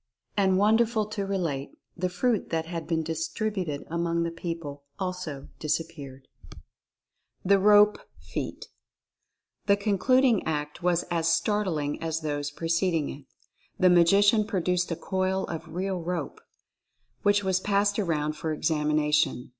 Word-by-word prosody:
And, 190 -2 +3
wonderful 220 +2 +3
to 200 -2 -3
re 195 0 -1
late, 145 -6 -3 0.2
the 185 0 -1
fruit 205 +4 0
that 160 -1 -1
had 165 -1 -5
been 160 -1 0
distributed 165 0 -3
among 170 0 -1
the 170 - -2
people 165 -4 -6 0.2
also 180 -7 -5
disappeared. 145 -4 -4 1.2
THE 195 +1 +5
ROPE 210 +1 +6 0.2
FEAT. - - -6 1.0
The 200 0 +5
concluding 225 +4 +3
act 150 -1 -3
was 175 -1 +1
as 165 -1 +1
startling 165 -5 0
as 165 0 -2
those 145 -2 -2
preced 165 +4 0
ing 155 -3 0
it. 140 0 -11 0.5
The 185 -1 +5
Magician 200 +5 +5
produced 180 -2 0
a 165 - -1
coil 190 +2 -1
of 165 - -7
real 190 0 -2
rope, 165 -3 -4 0.8
which 205 0 +3
was 190 -1 +1
passed 205 +1 +1
around 155 -6 0
for 160 +1 -3
examination. 150 -3 +1
175 Hz, 135 wpm, -27 LUFS, 160-200 Hz, 1.2 s, ROPE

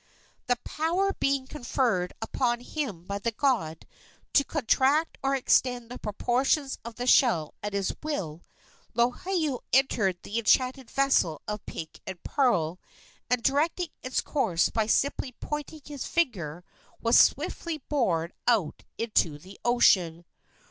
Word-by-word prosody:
The 245 - +3
power 355 +6 0
being 275 -1 0
conferred 240 -9 -1
upon 240 +1 0
him 245 - -4
by 200 +1 -3
the 230 - -1
god 215 - 0 0.5
to 280 - +5
contract 285 +2 +1
or 275 0 +1
extend 245 -2 +1
the 250 - -7
proportions 260 +6 0
of 235 -1 -8
the 245 - -4
shell 230 - +4
at 205 0 -4
his 200 -1 -1
will, 180 - -4 0.5
Lohiau 280 +4 0
entered 220 -8 +2
the 220 +3 -2
enchanted 255 +2 +2
vessel 270 - +1
of 210 -1 -4
pink 160 -1 -7
and 190 -2 -7
pearl, 180 - +1 0.5
and, 250 -1 +1
directing 320 +5 +1
its 255 - -1
course 210 - +1
by 220 -2 0
simply 265 +2 0
pointing 300 +1 -5
his 285 -4 -6
finger, 180 - -1 0.4
was 230 +1 +2
swiftly 335 -2 +2
borne 175 - 0
out 215 -11 +1
into 210 -9 +1
the 190 +6 -14
ocean. 180 -8 +3
245 Hz, 135 wpm, -27 LUFS, 195-275 Hz, 0.5 s, to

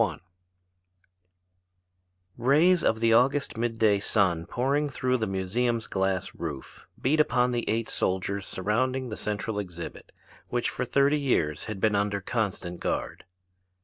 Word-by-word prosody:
] 95 -8 +1 2.2
Rays 155 +9 +4
of 110 0 +1
the 115 -1 +4
August 135 +5 +3
mid 115 0 -2
day 105 -3 +3
sun 95 -5 +1
pouring 140 +4 0
through 130 -1 0
the 110 - -1
museum's 110 +5 -1
glass 95 -1 -1
roof 75 -6 -7
beat 150 +5 +1
upon 125 -4 +3
the 120 -1 -2
eight 115 +1 0
soldiers 95 +1 -1
surrounding 125 +6 -1
the 110 - -4
central 105 0 -3
exhibit, 85 -4 -7 0.4
which 120 -1 -1
for - - -3
thirty 140 +4 +3
years 80 - 0
has 110 -2 -5
been 105 +2 +2
under 100 0 0
constant 95 -4 -3
guard. - - -3
110 Hz, 140 wpm, -27 LUFS, 95-125 Hz, 2.2 s, Rays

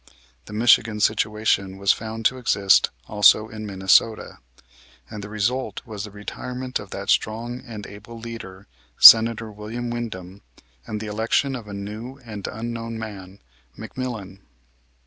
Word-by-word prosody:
The 105 - -11
Michigan 110 -1 +3
situation 105 -3 0
was 100 0 +3
found 110 0 -5
to 130 +3 +2
exist 100 -5 +3 0.2
also 105 +1 +4
in 110 -1 -7
Minnesota, 95 +3 +2 0.7
and 105 -1 -7
the 100 - -8
result 110 +5 -2
was 110 -3 -6
the - - -9
retirement 125 +5 -6
of 100 - -10
that 100 +1 -3
strong 120 +3 -1
and 110 -5 -9
able 105 +3 -11
leader, 115 -5 -9 0.3
Senator 115 -1 +8
William 110 +3 -6
Windom, 100 -5 -6 0.5
and 105 - -4
the - - -5
election 115 +6 0
of 115 -4 -8
a 100 - -8
new 110 +6 -7
and 105 -4 -7
unknown 115 0 -5
man, 100 -3 -9 0.4
McMillan. 110 -5 -6
110 Hz, 140 wpm, -23 LUFS, 100-115 Hz, 0.7 s, Senator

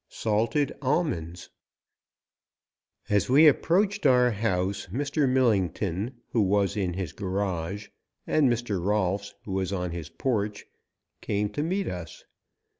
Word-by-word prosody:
SALTED 115 +7 0
ALMONDS 125 - -2 1.6
AS 105 +2 +1
WE 145 +5 +7
approached 190 +5 +3
our 125 -1 +5
house, 100 -3 -1
Mr. 140 +3 0
Millington, 105 -3 +1 0.2
who 115 - +2
was 100 -1 +2
in 95 -4 -1
his 95 -5 -4
garage, 95 0 -3 0.4
and 145 -4 +3
Mr. 110 -6 -2
Rolfs, 100 0 0
who 100 - -6
was 95 0 -1
on 90 -3 -2
his 85 -2 -6
porch, 105 +3 -2 0.6
came 105 0 -1
to 145 - -3
meet 185 +5 -1
us. 85 -3 -7
105 Hz, 120 wpm, -27 LUFS, 95-130 Hz, 1.6 s, WE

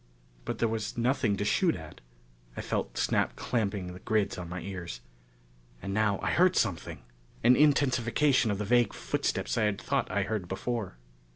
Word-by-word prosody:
But - - -3
there 115 - +2
was 110 0 -3
nothing 120 -4 +1
to 100 - -1
shoot 170 - +2
at. 80 -2 -10 0.6
I - - -2
felt - - -3
Snap - - +1
clamping 100 -6 -2
the 90 - -10
grids 105 0 0
on 85 -1 -6
my 90 +1 -4
ears. 85 -11 -6 0.8
And 95 +6 -5
now 105 -1 +2
I - - +1
heard 185 +1 +4
something! 90 - -1 0.4
An 125 +2 +7
intensification 140 -3 +3
of 100 - 0
the 105 - -3
vague 120 0 +3
footsteps - - -1
I 110 - +3
had 105 -1 0
thought - - -1
I - - 0
heard 105 -4 -3
before. 95 - -3
110 Hz, 175 wpm, -29 LUFS, 95-120 Hz, 0.8 s, An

